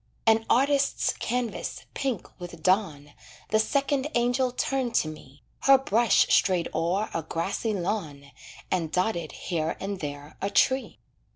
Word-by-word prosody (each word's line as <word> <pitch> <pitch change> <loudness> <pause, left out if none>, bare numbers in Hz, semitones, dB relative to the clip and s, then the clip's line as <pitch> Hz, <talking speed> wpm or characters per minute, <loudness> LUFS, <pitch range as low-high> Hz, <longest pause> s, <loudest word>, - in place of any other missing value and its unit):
An 225 0 +3
artist's 280 +2 +2
canvas, 245 -1 -3
pink 265 -8 -2
with 175 -1 -9
dawn, 160 -7 +1 0.4
The 215 - +3
second 280 +3 +1
angel 245 +2 +2
turned 250 -1 -1
to - - +3
me, 145 -3 -11 0.2
Her 275 0 +6
brush 235 -4 +3
strayed 180 -3 +3
o'er 185 +6 0
a 165 - -1
grassy 190 +7 -2
lawn 160 -8 -4 0.4
And 165 -4 0
dotted 175 -3 -1
here 165 -3 -3
and 195 0 -4
there 145 -1 -7
a 200 - 0
tree. 260 +5 +2
200 Hz, 135 wpm, -27 LUFS, 165-245 Hz, 0.4 s, Her